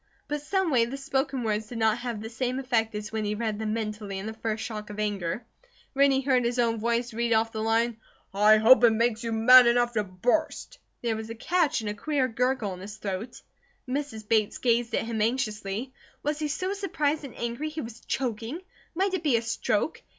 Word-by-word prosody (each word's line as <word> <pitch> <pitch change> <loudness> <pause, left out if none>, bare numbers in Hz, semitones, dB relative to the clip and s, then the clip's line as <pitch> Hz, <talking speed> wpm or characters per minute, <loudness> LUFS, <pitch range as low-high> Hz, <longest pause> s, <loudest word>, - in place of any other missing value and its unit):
But 295 0 -3
someway 305 -7 +2
the 255 +4 -6
spoken 270 -1 -1
words 215 -1 -1
did 235 - -7
not 220 0 +2
have 240 -3 -4
the 220 - -5
same 250 +2 -2
effect 230 -5 0
as 210 0 -5
when 220 -1 -2
he 210 0 -1
read 215 -1 -2
them 215 -1 -1
mentally 210 -3 -4
in 190 - -5
the 220 - -4
first 220 0 -3
shock 215 -2 -6
of 210 0 -7
anger. 205 0 -2 0.5
When 280 +1 +5
he 270 0 +2
heard 260 -2 +2
his 240 +1 -1
own 230 -2 +1
voice 235 +1 -1
read 235 +1 +1
off 225 0 +2
the 220 - -4
line, 225 +1 +1 0.4
"I 210 +2 +6
hope 245 +4 +7
it 235 - +8
makes 230 +1 +1
you 230 - -2
mad 245 +3 +8
enough 240 0 +3
to 215 -2 +1
burst," 220 - -1 0.2
there 230 -2 0
was 220 0 -6
a 230 - -5
catch 320 +2 +1
and 215 - -3
a - - -4
queer 270 +4 0
gurgle 250 -4 0
in 180 - -9
his 205 +3 -8
throat. 205 +4 -5 0.4
Mrs. 255 -5 -4
Bates 215 -2 +2
gazed 235 -1 +1
at - - 0
him 225 -2 -2
anxiously. 220 0 -2 0.3
Was 295 +1 -1
he 305 - -1
so 370 +6 -2
surprised 310 -7 -1
and 275 - -9
angry 235 +6 -3
he 310 +1 -5
was 230 0 -8
choking? 240 +4 -3 0.4
Might 380 +2 +1
it 375 - 0
be 290 -8 +3
a - - -1
stroke? 225 +3 -1
230 Hz, 215 wpm, -27 LUFS, 220-260 Hz, 0.5 s, it